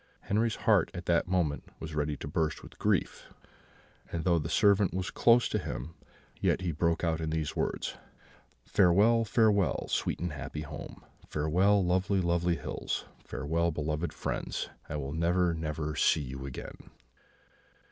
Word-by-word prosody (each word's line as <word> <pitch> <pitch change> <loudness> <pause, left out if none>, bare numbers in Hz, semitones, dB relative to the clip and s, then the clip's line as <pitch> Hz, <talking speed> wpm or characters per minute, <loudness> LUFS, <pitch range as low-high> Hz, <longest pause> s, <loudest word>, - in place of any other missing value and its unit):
Henri's 110 +2 +1
heart 105 -7 +3
at 90 0 -6
that 85 0 +2
moment 90 -6 0 0.2
was 80 -1 -6
ready 75 -1 -1
to - - -7
burst 80 0 -1
with - - -14
grief, - - 0 0.8
and 85 -2 -2
though 85 -1 +3
the 75 - -4
servant 100 -3 +3
was 95 -1 -2
close 120 +1 +5
to - - -1
him, 65 +7 -5 0.5
yet - - +1
he 90 -2 -1
broke 85 +2 0
out 80 -2 0
in 80 - -2
these 80 -1 -2
words: - - -2 0.7
"'Farewell, 105 +5 +4
farewell, 105 -4 +2
sweet - - -1
and 85 -3 -3
happy 70 +2 -5
home! 75 +1 -8 0.2
Farewell, 90 +6 +2
lovely, 95 +2 +2
lovely 85 -1 +1
hills! - - -4 0.2
Farewell, 80 +5 -1
beloved 75 +1 -2
friends! - - -3 0.2
I - - -4
shall 70 -2 -3
never, 85 +2 +2
never 75 -1 -3
see 75 - +3
you 65 0 -6
again!' 65 - -9
85 Hz, 155 wpm, -30 LUFS, 75-95 Hz, 0.8 s, close